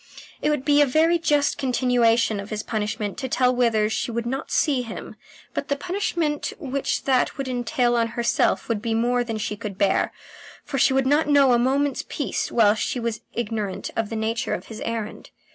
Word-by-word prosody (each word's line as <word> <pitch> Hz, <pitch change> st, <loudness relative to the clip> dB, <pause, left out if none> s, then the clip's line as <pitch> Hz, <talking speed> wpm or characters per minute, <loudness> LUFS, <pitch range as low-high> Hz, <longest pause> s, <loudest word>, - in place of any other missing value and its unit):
It -, -, +1 dB
would 295 Hz, -3 st, -1 dB
be 290 Hz, 0 st, +5 dB
a 290 Hz, -, +5 dB
very 325 Hz, +5 st, +3 dB
just 295 Hz, -3 st, +1 dB
continuation 240 Hz, -4 st, +2 dB
of 200 Hz, +1 st, -7 dB
his 215 Hz, 0 st, -3 dB
punishment 210 Hz, -2 st, -3 dB
to 260 Hz, -, -3 dB
tell 250 Hz, 0 st, +2 dB
Withers 220 Hz, -3 st, +2 dB
she -, -, -2 dB
would 235 Hz, 0 st, -3 dB
not 265 Hz, +4 st, -3 dB
see 275 Hz, -4 st, +2 dB
him, 230 Hz, -2 st, -8 dB, 0.4 s
but -, -, -3 dB
the 280 Hz, -, 0 dB
punishment 335 Hz, -2 st, -2 dB
which 275 Hz, -4 st, -2 dB
that 260 Hz, -2 st, +1 dB
would 275 Hz, -1 st, -3 dB
entail 245 Hz, 0 st, 0 dB
on 230 Hz, -1 st, +2 dB
herself 235 Hz, 0 st, +1 dB
would 225 Hz, -3 st, -1 dB
be 225 Hz, -1 st, -1 dB
more 245 Hz, +2 st, +1 dB
than 225 Hz, -2 st, -4 dB
she 210 Hz, 0 st, -3 dB
could 205 Hz, -2 st, -7 dB
bear, 200 Hz, -, +2 dB, 0.5 s
for 275 Hz, -, -2 dB
she -, -, +5 dB
would 265 Hz, 0 st, +2 dB
not 295 Hz, +3 st, +2 dB
know 280 Hz, -3 st, +5 dB
a 240 Hz, -, +4 dB
moment's 275 Hz, +3 st, +1 dB
peace -, -, -2 dB
while 215 Hz, -3 st, +5 dB
she 220 Hz, +3 st, -2 dB
was 230 Hz, -2 st, -3 dB
ignorant 215 Hz, -4 st, -3 dB
of 225 Hz, -2 st, -1 dB
the 225 Hz, -, -4 dB
nature 225 Hz, +2 st, -1 dB
of -, -, -9 dB
his 220 Hz, -1 st, -7 dB
errand. 230 Hz, -2 st, -4 dB
245 Hz, 200 wpm, -24 LUFS, 225-275 Hz, 0.5 s, be